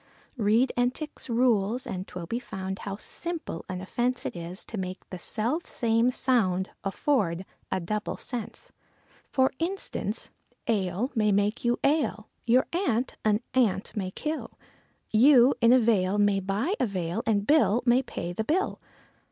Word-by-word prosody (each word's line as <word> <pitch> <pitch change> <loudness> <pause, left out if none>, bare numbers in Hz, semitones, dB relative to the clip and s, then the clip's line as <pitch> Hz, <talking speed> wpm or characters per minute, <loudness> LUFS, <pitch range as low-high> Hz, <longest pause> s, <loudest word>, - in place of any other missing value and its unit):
Read 225 +4 +3
Entick's 250 +4 -2
rules, 235 -1 +2
and 185 +1 -5
'twill 175 -2 -6
be 230 +8 -2
found, 190 -5 -5
how 200 -1 -5
simple 330 - -5
an 180 0 -4
offence 245 +6 -1
It - - -3
is 175 +2 -5
to 225 - -7
make 185 0 -6
the 185 - -6
self 240 - 0
same 230 +1 +2
sound 205 -8 +2
afford 195 - 0 0.3
a - - +1
double 210 +5 -3
sense. 245 - -4 0.6
For 265 -1 +3
instance, 330 - -3 0.4
ale 205 +2 0
may 215 -4 +2
make 205 +3 +1
you 240 0 +2
ail, 275 -7 +1 0.2
your 250 +3 +4
aunt 265 - 0
an 215 0 +2
ant 210 -7 +1
may 190 -3 -2
kill, 305 +10 -5 0.5
You 250 +3 +6
in 230 0 +6
a 255 - +8
vale 205 -5 +2
may 205 -1 +3
buy 200 - -1
a 255 - +2
veil 180 -4 -2
and 205 -2 +2
Bill 250 -6 +4
may 245 +1 +5
pay 175 -9 -5
the 220 - -2
bill. 335 - 0
225 Hz, 155 wpm, -27 LUFS, 195-255 Hz, 0.6 s, a